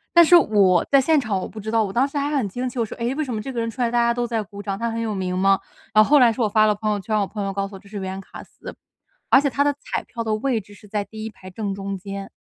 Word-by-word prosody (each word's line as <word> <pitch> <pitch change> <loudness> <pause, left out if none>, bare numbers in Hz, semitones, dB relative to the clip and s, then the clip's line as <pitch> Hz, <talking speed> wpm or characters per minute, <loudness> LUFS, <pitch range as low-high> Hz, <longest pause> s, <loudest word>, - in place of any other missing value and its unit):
但 340 - +9
是 350 +2 +6
我 195 - +4
在 275 -1 +6
现 310 +2 +3
场 215 -7 -1
我 - - -4
不 215 - -10
知 220 +2 -5
道， 225 -1 +3
我 195 - -3
当 250 +7 +2
时 285 - -6
还 285 +1 0
很 235 - 0
惊 250 +6 -3
奇， 245 - -11
我 230 - +1
说： - - -8
“诶， 240 +3 -1
为 310 - -1
什 255 -4 -4
么 215 - -3
这 265 - -6
个 240 - -3
人 230 - -1
出 250 - -6
来 235 - +2
大 240 - -1
家 235 0 +3
都 240 0 -2
在 225 -2 -1
鼓 200 0 -10
掌， 195 -1 -3
他 230 +1 -2
很 230 0 -3
有 215 -3 -2
名 185 -1 -2
吗？” 195 +1 +3 0.3
呃， 215 0 +7
后 295 +5 +5
来 240 -3 +6
是 225 - -8
我 220 - +3
发 215 +1 +4
了 210 - +2
朋 215 +1 -1
友 205 - -1
圈， 215 +2 -1
我 200 - +1
朋 205 +1 -5
友 195 - -2
告 195 0 -2
诉 200 - -15
我 190 - -9
这 200 0 -18
是 210 - -7
原 190 0 -5
卡 - - -11
司。 - - -11 0.5
而 270 - +7
且 280 - +1
它 285 +2 +1
的 290 0 +2
彩 - - -4
票 230 -1 -6
的 215 -1 0
位 230 -1 -1
置 205 +1 -16
是 210 - -16
在 205 0 -2
第 220 +1 -8
1 220 - -4
排 185 -2 -13
正 200 +1 -4
中 195 0 -4
间。 195 +1 -7
215 Hz, 365 characters per minute, -22 LUFS, 200-240 Hz, 0.5 s, 但